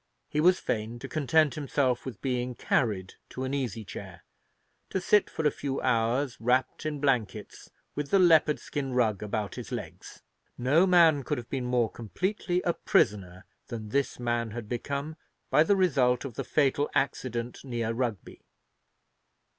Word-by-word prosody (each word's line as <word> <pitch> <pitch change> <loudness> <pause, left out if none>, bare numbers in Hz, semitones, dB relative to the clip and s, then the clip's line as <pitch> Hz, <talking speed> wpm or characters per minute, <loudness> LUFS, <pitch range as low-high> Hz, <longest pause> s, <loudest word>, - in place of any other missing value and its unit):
He 150 - 0
was 180 +3 +5
fain 110 +2 -3
to 125 - -7
content 155 0 +2
himself 135 -3 -1
with 130 - -8
being 125 -2 -1
carried 100 -9 0 0.2
to 130 - -5
an 130 +1 -3
easy 120 -6 -3
chair, 95 -5 -9 0.7
to 190 - -1
sit 205 +2 +3
for 160 - -4
a 150 - +4
few 135 -1 -3
hours, 125 +2 +1
wrapped 130 +5 +1
in 150 -2 -3
blankets, 120 -7 -1 0.2
with 145 -1 -4
the 195 - +4
leopard 160 -4 +5
skin 135 -3 -4
rug 110 -5 +1
about 105 -1 -3
his - - -8
legs. - - -7 0.3
No 150 +9 +3
man 165 -5 +5
could - - -2
have 120 -1 -8
been 130 -3 -2
more 125 -3 +1
completely 180 - -2
a 170 - +1
prisoner 95 - 0 0.2
than 110 -3 -6
this 140 +2 -1
man 120 -1 -1
had 110 0 -7
become 140 +6 -4 0.3
by - - +5
the 180 +6 +4
result 135 -9 +2
of 135 - -6
the - - -4
fatal 145 0 +1
accident 125 -3 -1
near 120 -4 -2
Rugby. 115 -4 -4
130 Hz, 160 wpm, -28 LUFS, 115-150 Hz, 0.7 s, was